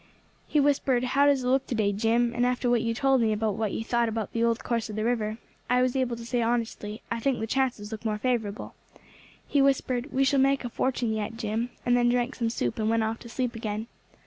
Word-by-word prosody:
He 300 - +2
whispered, 275 -3 +2
'How 275 +3 +3
does 275 -3 +3
it - - -2
look 265 +1 +2
to 250 - -2
day, 205 -2 +1
Jim?' 230 +3 +1
and 240 - 0
after 250 0 +1
what 240 -2 +3
you 230 0 -1
told 270 0 +3
me 220 -1 +2
about 215 0 0
what 215 0 -2
you - - -3
thought 235 0 +1
about 220 -2 -4
the 230 - 0
old 230 0 +1
course 230 -2 -1
of 210 - -6
the 215 - -1
river, 220 -2 0 0.3
I 250 0 +4
was 255 0 0
able 255 -3 0
to 230 0 -9
say 240 0 0
honestly, 225 -2 -2
'I 230 - -1
think 265 +2 0
the 220 - -1
chances 235 -3 -1
look 220 0 -6
more 215 -2 -1
favourable.' 220 -3 -2 0.7
He 285 - +2
whispered, 265 -1 +1
'We 270 - +2
shall 275 +1 +3
make 275 -1 +2
a - - -3
fortune 245 -2 -1
yet, 220 +1 -3
Jim,' 225 +2 -2 0.2
and 245 0 +3
then 240 0 +3
drank 245 +2 +1
some 230 -2 -1
soup 125 - -2
and 215 0 +1
went 225 0 +2
off 220 +1 -2
to 235 - -11
sleep 250 0 -2
again. 220 -1 -3
235 Hz, 250 wpm, -27 LUFS, 220-255 Hz, 0.7 s, I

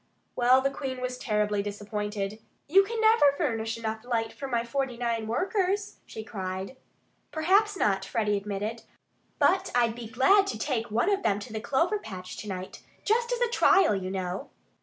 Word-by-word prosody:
Well, 255 +2 +5
the 275 +1 +1
Queen 270 -2 -5
was 250 0 -4
terribly 210 -1 0
disappointed. 205 0 -4 0.3
"You 385 +7 +6 0.2
never 440 -6 +5
can - - -11
furnish 225 -7 -1
enough 220 -1 -4
light 230 -2 -1
for 275 - -6
my 235 -3 0
forty 260 0 -2
nine 230 -2 -1
workers!" 385 - -1
she 220 - -7
cried. 190 +1 -5 0.6
"Perhaps 390 +6 +2
not!" 195 - +1
Freddie 210 +1 0
admitted. 210 +3 -3 0.6
"But 375 +1 +3
I'd 235 -2 +3
be 235 -1 -8
glad 385 - +4
to - - -3
take 235 -1 -2
one 235 - +1
of 400 0 +1
them 205 - +1
to 220 +2 -9
the 220 - -3
clover 330 - +1
patch 185 - -8
to 215 - -7
night, 185 -1 -6 0.2
just 470 +3 +1
as - - -1
a 485 - +3
trial, 390 - +4
you 190 -2 -2
know." 185 -1 -4
235 Hz, 180 wpm, -28 LUFS, 210-305 Hz, 0.6 s, You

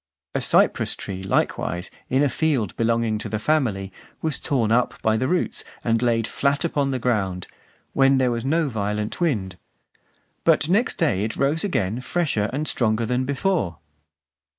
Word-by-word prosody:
A - - 0
cypress - - +2
tree 95 -1 -6
likewise, 90 -2 -1 0.2
in 135 +3 +3
a - - +4
field 130 - 0
belonging 115 -1 +1
to 110 - -5
the 110 - -1
family, 110 -7 0 0.3
was 160 -3 -1
torn 120 -7 0
up 125 +2 +1
by 110 0 +3
the 130 +4 0
roots, 180 +4 0 0.2
and 115 -1 +1
laid 115 -2 +2
flat 140 +6 0
upon 145 -4 0
the 130 - -1
ground, 100 -7 -1 0.5
when 135 0 +4
there 130 -2 +2
was 115 -1 -2
no 160 +4 +1
violent 105 - -3
wind; 100 - -1 0.8
but 150 - +4
next 210 +8 +2
day 140 - +1
it 110 - -3
rose 145 +4 +1
again 115 - -1
fresher 130 -9 0
and 150 +4 -2
stronger 110 -1 +1
than 125 +3 0
before. 140 - 0
120 Hz, 165 wpm, -23 LUFS, 105-140 Hz, 0.8 s, a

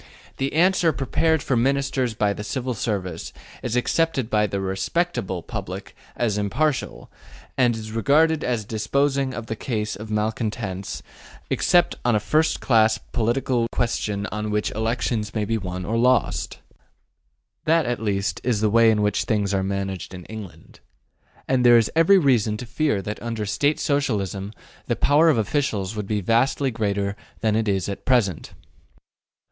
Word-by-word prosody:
The 135 +1 -2
answer 175 +1 +4
prepared 155 +3 +1
for 130 - 0
Ministers 135 -1 +1
by 105 -1 +1
the 105 - -6
Civil 130 +3 -3
Service 95 -7 -3 0.3
is 120 -1 -3
accepted 130 -1 0
by 105 -1 +3
the 100 - -3
``respectable'' 95 - -2
public - - -6 0.2
as 110 -4 0
impartial, 130 +8 -1 0.4
and 120 -3 +3
is 110 -1 -7
regarded 150 +7 +3
as 120 -4 -1
disposing 135 +5 0
of 115 - -5
the 115 - -4
case 105 -3 -3
of 105 +3 -9
malcontents 105 -2 -3 0.5
except 175 -1 +3
on 120 -2 +2
a - - +3
first 155 +9 +1
class 110 -3 +4
political 120 +1 0
question 105 -4 -1
on 105 +1 -3
which 105 0 0
elections 110 -1 -2
may 105 -1 0
be 115 +1 -1
won 90 -1 -5
or 115 +4 0
lost. 125 +1 +1 1.1
That 165 0 +3
at 120 -1 -2
least 100 -2 -1
is 120 -4 +1
the 105 0 +1
way 115 0 +6
in 105 -1 +2
which 105 -1 +1
things 105 -3 0
are 95 - +1
managed 95 -1 -3
in 90 -1 -10
England. 110 -4 -10 0.7
And 130 -1 +2
there 120 -1 +8
is 115 -2 +2
every 165 +5 +6
reason 120 - +2
to 125 - -7
fear 120 -4 0
that 105 +2 -5
under 115 -2 -3
State 145 +9 +1
Socialism 105 - -1 0.4
the - - +1
power 150 +3 +4
of 150 - +3
officials 110 -4 -1
would 105 -2 -4
be 105 -1 -1
vastly 130 +6 +2
greater 100 -3 -1 0.3
than 110 -2 +2
it 110 0 0
is 95 -3 0
at 100 - -5
present. 115 -10 +1
110 Hz, 160 wpm, -23 LUFS, 105-130 Hz, 1.1 s, there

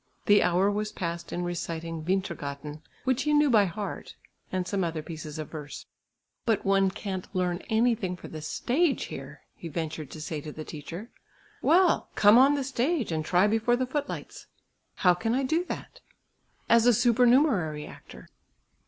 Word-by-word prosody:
The 205 -1 +6
hour 185 +3 +3
was 210 +1 -2
passed 170 -1 -5
in 175 - -2
reciting 165 -2 -4
"Vintergatan," 150 -5 -3 0.2
which 260 0 +1
he 300 +2 +2
knew 295 -2 +4
by 210 -3 +5
heart, 200 +3 -6 0.4
and 185 -1 -1
some 195 -2 0
other 165 -2 -3
pieces 155 -1 -7
of 155 -2 -6
verse. 150 -2 -8 0.6
"But 225 -5 0
one 195 0 +3
can't 190 -1 -5
learn 180 -1 0
anything 220 -5 +1
for - - -10
the 155 - -8
stage 270 - 0
here," - - -9
he 170 - -9
ventured 155 -2 -4
to 155 - -9
say 155 -1 -4
to 150 - -7
the 155 +1 -8
teacher. 170 - -8 0.5
"Well! 355 +1 +3
come 210 +3 +7
on 275 +3 +6
the 280 - -1
stage, 265 - -1
and 160 -1 -1
try 180 +4 +3
before 225 +3 +2
the 255 +1 0
footlights." 280 +3 -5 0.5
"How 180 -2 +4
can 225 +7 -1
I 270 - +1
do 320 +6 +1
that?" - - -7 0.7
"As 235 0 +5
a 245 - +6
supernumerary 240 - +3
actor." - - -13
195 Hz, 170 wpm, -27 LUFS, 165-240 Hz, 0.7 s, come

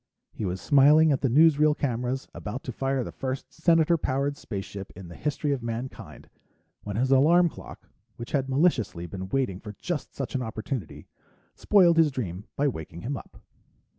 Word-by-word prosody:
He 105 - -5
was 90 0 -3
smiling 150 +5 +5
at 140 - +1
the 135 - +1
newsreel 150 +2 +5
cameras, 125 0 -2
about 110 +6 -6
to 125 - -5
fire 135 +1 -1
the - - -7
first 130 0 -5
Senator 165 0 +3
powered 140 +2 -1
spaceship 100 -5 -7
in 95 -3 -10
the 85 - -10
history 150 0 -2
of 135 -3 -1
mankind, 115 +2 -6 0.5
when 105 -1 -6
his 130 +4 +1
alarm 165 +6 +5
clock, - - -12 0.3
which 120 0 -8
had 135 -2 0
maliciously 125 - +1
been 95 +2 -7
waiting 125 -7 -1
for 105 -1 -9
just 155 - -5
such 135 - -4
an 130 - -1
opportunity, 110 - -5 0.5
spoiled 175 -5 +4
his 160 -2 +5
dream 105 -8 -5
by 145 - +1
waking 80 - -5
him 135 +5 -3
up. - - -12
130 Hz, 175 wpm, -26 LUFS, 110-145 Hz, 0.5 s, smiling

